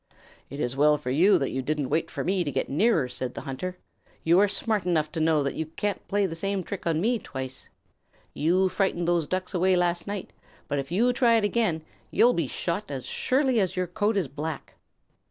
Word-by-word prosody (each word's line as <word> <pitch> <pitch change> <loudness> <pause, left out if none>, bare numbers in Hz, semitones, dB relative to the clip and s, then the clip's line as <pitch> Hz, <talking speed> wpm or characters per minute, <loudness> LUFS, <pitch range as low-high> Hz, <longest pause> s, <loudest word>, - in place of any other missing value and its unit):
"It 140 - -7
is 125 -2 -1
well 150 +2 +4
for 125 - -4
you 180 +9 +5
that 135 - -1
you 130 - -2
didn't 145 -1 -2
wait 160 +2 +1
for - - -4
me 185 0 +1
to 150 - -3
get - - -1
nearer," 160 - +2
said 125 0 -5
the - - -5
hunter. 180 +7 -5 0.5
"You 170 +3 +5
are 205 - +5
smart 215 -1 0
enough 155 -3 +1
to 165 - -4
know 160 -2 +3
that 140 - -1
you 160 - -3
can't 200 +5 -3
play 205 0 +1
the 175 - -3
same 195 +3 -2
trick 190 0 -6
on 160 -1 +1
me 230 +6 +1
twice. 130 -6 -7 0.6
You 180 +5 +2
frightened 185 -3 0
those 170 -3 +1
Ducks 185 +3 -3
away 185 +1 +3
last 175 0 0
night, 200 -2 -5 0.3
but 145 -1 -1
if 135 +3 -6
you 235 +7 +3
try 240 -2 +4
it 220 - +1
again, 205 -7 +1 0.3
you'll 245 +1 +4
be 165 -5 -1
shot 185 +9 -3
as 135 -3 -5
surely 260 -2 +1
as 190 -3 0
your 185 0 0
coat 205 +4 0
is 185 -7 +1
black." 150 +3 -6
175 Hz, 220 wpm, -26 LUFS, 150-200 Hz, 0.6 s, you